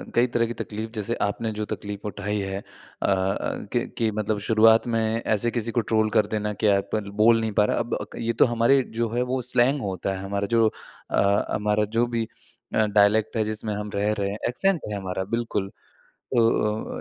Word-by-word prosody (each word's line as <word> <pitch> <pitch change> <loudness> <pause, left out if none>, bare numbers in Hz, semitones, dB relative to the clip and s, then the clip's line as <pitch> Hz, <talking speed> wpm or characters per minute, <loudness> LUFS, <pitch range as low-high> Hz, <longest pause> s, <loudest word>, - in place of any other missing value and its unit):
कई 120 +1 +4
तरह 115 -1 +3
की 120 - -4
तकलीफ 110 0 -5
जैसे 110 +2 -2
आपने 110 +2 -1
जो 105 0 -3
तकलीफ 105 0 -6
उठाई 105 0 -3
है 95 0 -3
अ - - -10
अ, 95 +1 -1
कि 120 +1 +1
कि 115 -3 +1
मतलब 105 0 -1
शुरुआत 110 +1 +5
में 115 -1 +1 0.3
ऐसे 110 +2 +1
किसी 115 -1 -1
को 120 - +1
ट्रोल 110 0 +1
कर 105 -1 +2
देना 105 -1 -2
कि 105 +2 0
आप 100 0 +2
ल 100 -2 -3
बोल 115 +1 +6
नहीं 110 -1 -1
पा 105 +1 +3
रहा। - - 0
अब 120 0 -2 0.2
क - - -9
ये 115 0 0
तो - - +5
हमारे 120 +3 +3 0.2
जो 115 -1 +1
है 125 - +1
वो 130 -1 0
स्लैंग 125 +3 +2
होता 95 -1 -2
है 95 - -6
हमारा 100 0 -2
जो 115 -1 +4 0.4
अ, 100 +1 +2
हमारा 105 0 +1
जो 120 - +4
भी 115 -1 -1 0.5
अ, 110 - +4
डायलेक्ट 105 +2 +3
है 110 - +2
जिसमें 110 0 -3
हम 105 0 -4
रह 105 +1 +1
रहे 100 0 0
हैं, 105 - -4
एक्सेंट 190 +7 +1
है - - -2
हमारा 95 -1 -3
बिल्कुल। 110 -4 -2 0.6
तो 115 -2 +1
110 Hz, 210 wpm, -25 LUFS, 100-115 Hz, 0.6 s, बोल